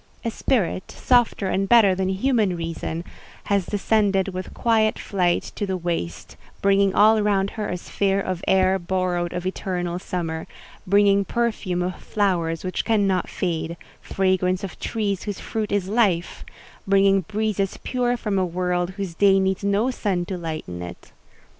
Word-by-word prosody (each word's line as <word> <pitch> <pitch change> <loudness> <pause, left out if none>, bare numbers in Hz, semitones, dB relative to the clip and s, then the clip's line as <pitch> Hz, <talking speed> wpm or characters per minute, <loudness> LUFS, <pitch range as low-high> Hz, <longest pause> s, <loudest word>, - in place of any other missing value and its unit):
A 230 - 0
spirit, 210 -7 -1
softer 240 -5 +2
and 195 +1 0
better 225 -5 +6
than 190 0 -1
Human 205 -1 +1
Reason, 165 0 -4 0.4
has 200 -3 0
descended 200 -2 +1
with 185 -1 -6
quiet 220 -2 +2
flight 180 -3 0
to 205 - -3
the 190 -1 -1
waste—bringing 185 - -1
all 215 +1 +5
round 200 -1 +1
her 210 -2 -4
a 180 - -2
sphere 195 +2 0
of 185 -3 -3
air 190 0 +3
borrowed 175 -1 -1
of 180 0 -4
eternal 180 -2 -2
summer; 165 -3 -4 0.4
bringing 200 +1 +4
perfume 210 -6 -1
of 180 0 -3
flowers 170 -6 0
which 185 -1 -2
cannot 200 -5 +1
fade—fragrance 185 +2 -2
of 195 - -7
trees 205 -4 -2
whose 205 -2 -4
fruit 215 -2 -3
is 200 -2 0
life; 195 -6 +1 0.4
bringing 195 0 +4
breezes 205 +1 -2
pure 245 -1 0
from 205 -4 -1
a - - +2
world 180 0 -1
whose 195 -4 -4
day 195 +2 +4
needs 190 0 0
no 200 +5 +2
sun 190 -7 -1
to 190 - -4
lighten 155 - -5
it. 90 0 -9
190 Hz, 150 wpm, -23 LUFS, 180-205 Hz, 0.4 s, better